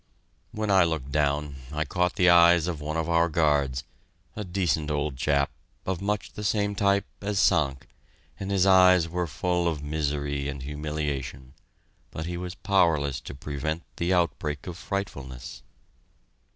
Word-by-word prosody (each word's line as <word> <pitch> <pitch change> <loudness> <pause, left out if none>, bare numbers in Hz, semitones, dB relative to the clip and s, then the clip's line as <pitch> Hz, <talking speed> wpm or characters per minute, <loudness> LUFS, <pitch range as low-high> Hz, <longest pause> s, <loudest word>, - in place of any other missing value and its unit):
When 105 -1 -2
I 95 -2 +6
looked 80 -5 -2
down, 75 -1 0
I 75 +1 -1
caught 90 +4 0
the 90 - +3
eyes 85 -1 +7
of 85 -4 -3
one 75 +2 -3
of 80 0 -1
our 85 0 +3
guards, 70 -5 +1 0.5
a 105 - -4
decent 90 -5 -1
old 75 -1 -1
chap, 70 +2 +1 0.3
of 95 -1 -2
much 105 0 -2
the 105 - -7
same 105 0 +1
type 100 0 +2 0.2
as 100 0 -2
Sank, 70 -8 +2 0.5
and 95 - -4
his 100 -1 +3
eyes 90 -3 +6
were 90 +1 -2
full 90 +4 0
of 75 -4 -2
misery 70 -1 -2
and 70 -2 -6
humiliation, 70 -3 -4 0.6
but 80 - -6
he 85 +1 -4
was 90 +1 -5
powerless 75 -9 +2
to - - -8
prevent 75 +4 -4
the 85 +2 0
outbreak 75 -5 0
of 90 - -6
frightfulness. 70 -11 -5
80 Hz, 155 wpm, -26 LUFS, 70-90 Hz, 0.6 s, eyes